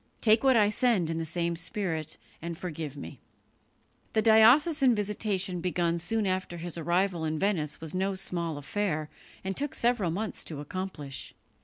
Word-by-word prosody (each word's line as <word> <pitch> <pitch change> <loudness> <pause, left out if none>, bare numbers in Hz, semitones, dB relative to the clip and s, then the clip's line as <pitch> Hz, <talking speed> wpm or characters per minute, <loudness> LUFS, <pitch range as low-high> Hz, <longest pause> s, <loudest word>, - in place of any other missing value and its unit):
Take 220 +1 +4
what 260 -3 +5
I 210 -1 +4
send 215 -8 +2
in 165 - -2
the 165 - -2
same 170 +1 -1
spirit, 165 -2 -3 0.2
and 170 0 -5
forgive 155 -5 -5
me." 85 - -8 0.9
The 220 - +2
diocesan 250 +5 +6
visitation 200 -3 -1
begun 170 -1 0
soon 220 +5 -1
after 185 -2 -1
his 170 0 -4
arrival 175 +1 0
in 155 0 -1
Venice 160 -5 0
was 160 -1 -6
no 190 +1 0
small 170 -4 -3
affair, 155 0 -2 0.3
and 190 0 -3
took 290 0 -2
several 235 -7 +2
months 200 +5 -3
to 155 -3 -6
accomplish. 150 -3 -6
185 Hz, 160 wpm, -29 LUFS, 165-210 Hz, 0.9 s, diocesan